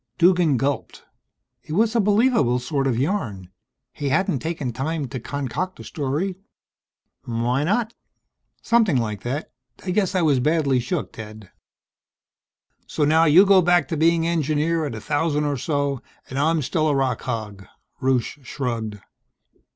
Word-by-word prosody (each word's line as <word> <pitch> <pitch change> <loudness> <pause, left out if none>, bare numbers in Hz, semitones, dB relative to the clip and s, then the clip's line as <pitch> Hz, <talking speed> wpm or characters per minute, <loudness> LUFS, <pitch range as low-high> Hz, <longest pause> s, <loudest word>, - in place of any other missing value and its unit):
Duggan 175 -5 +4
gulped. 135 +3 -2 0.6
It 155 - -8
made 220 +5 +2
a - - +4
believable 210 - +3
sort 135 +2 -1
of 125 -4 0
yarn. 120 - -2 0.4
He 145 -1 -3
hadn't 150 -2 +1
taken 150 -5 -3
time 145 +3 -2
to 130 - -5
concoct 140 +8 -4
a - - -8
story.... 155 +6 -2 0.9
Why 120 +3 0
not? 220 +7 0 0.7
"Something 225 - +3
like 105 -4 -2
that. 135 +5 -4 0.3
I 185 - -1
guess 195 -1 0
I 180 - +2
was 145 -5 +3
badly 140 -1 +2
shook, 140 +7 -3
Ted." 110 -3 -10 1.4
"So 150 - 0
now 160 +2 +4
you 170 +6 +7
go 195 -1 +6
back 175 -4 +3
to - - -1
being 165 +1 +3
engineer 160 0 0
at 125 - -5
a 110 - -7
thousand 150 +2 0
or 145 -1 0
so, 140 -1 -1 0.3
and 135 - -2
I'm 160 +1 +2
still 155 +4 0
a 145 - +2
rock 135 -2 0
hog." 105 -6 -5 0.3
Rusche 130 +1 0
shrugged. 115 -5 -4
145 Hz, 150 wpm, -23 LUFS, 125-170 Hz, 1.4 s, you